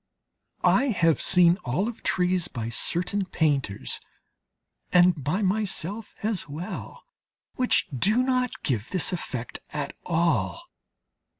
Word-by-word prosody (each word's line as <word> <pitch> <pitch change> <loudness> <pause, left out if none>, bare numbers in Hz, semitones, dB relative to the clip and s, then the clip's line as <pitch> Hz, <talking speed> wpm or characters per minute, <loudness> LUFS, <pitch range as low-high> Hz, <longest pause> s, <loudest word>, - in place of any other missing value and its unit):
I 275 - +4
have 170 - +2
seen 180 0 +5
olive 195 - -2
trees 180 -1 +1
by 115 -7 -5
certain 180 - -1
painters, 140 - -1 0.9
and 175 -4 +4
by 175 +10 0
myself 200 +1 -2
as 210 -7 -1
well, 170 +8 -7 0.5
which 250 -1 +2
do 210 - +3
not 255 -1 -1
give 120 -5 -1
this 185 -1 +1
effect 130 -8 -4
at 145 -2 -4
all. 170 - 0
180 Hz, 110 wpm, -26 LUFS, 150-205 Hz, 0.9 s, seen